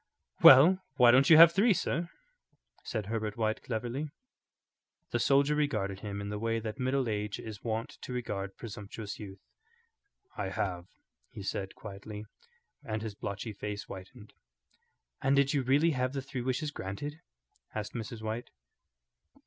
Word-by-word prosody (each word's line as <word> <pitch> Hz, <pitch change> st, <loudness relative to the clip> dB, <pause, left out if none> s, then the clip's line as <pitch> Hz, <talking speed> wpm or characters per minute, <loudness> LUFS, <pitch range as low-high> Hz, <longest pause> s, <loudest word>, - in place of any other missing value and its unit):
"Well, 160 Hz, +9 st, +9 dB, 0.2 s
why 125 Hz, -3 st, +7 dB
don't 135 Hz, +5 st, +5 dB
you 160 Hz, -, +9 dB
have 165 Hz, 0 st, +10 dB
three, 200 Hz, +4 st, +4 dB
sir?" 170 Hz, +2 st, -1 dB, 0.7 s
said 110 Hz, -3 st, -3 dB
Herbert 110 Hz, 0 st, -3 dB
White, 110 Hz, -1 st, 0 dB
cleverly. 125 Hz, +5 st, -3 dB, 1.0 s
The -, -, 0 dB
soldier 140 Hz, +1 st, +4 dB
regarded 110 Hz, -11 st, -1 dB
him 100 Hz, -1 st, -5 dB
in 100 Hz, -, -5 dB
the 105 Hz, 0 st, -4 dB
way 115 Hz, +1 st, 0 dB
that 110 Hz, +3 st, -6 dB
middle 130 Hz, 0 st, +1 dB
age 105 Hz, -1 st, -2 dB
is 110 Hz, -2 st, -8 dB
wont 115 Hz, 0 st, -3 dB
to -, -, -7 dB
regard 100 Hz, -6 st, -4 dB
presumptuous 105 Hz, -1 st, -7 dB
youth. 100 Hz, -2 st, -10 dB, 0.9 s
"I 95 Hz, -, -3 dB
have," 90 Hz, -2 st, -3 dB, 0.4 s
he 100 Hz, -, -9 dB
said, 95 Hz, 0 st, -4 dB
quietly, 105 Hz, +1 st, -8 dB, 0.6 s
and 110 Hz, -4 st, -3 dB
his 110 Hz, -2 st, -4 dB
blotchy 105 Hz, +1 st, -5 dB
face 105 Hz, +1 st, -5 dB
whitened. 105 Hz, +4 st, -11 dB, 0.9 s
"And 135 Hz, +1 st, +3 dB
did 140 Hz, 0 st, +3 dB
you 140 Hz, -, +2 dB
really 140 Hz, +6 st, +3 dB
have 130 Hz, -2 st, -1 dB
the 135 Hz, -, -2 dB
three 135 Hz, -2 st, -5 dB
wishes 130 Hz, +4 st, -1 dB
granted?" 145 Hz, +10 st, -6 dB, 0.5 s
asked 105 Hz, -1 st, -4 dB
Mrs. 115 Hz, -1 st, -6 dB
White. 110 Hz, +2 st, -4 dB
115 Hz, 150 wpm, -31 LUFS, 105-135 Hz, 1.0 s, have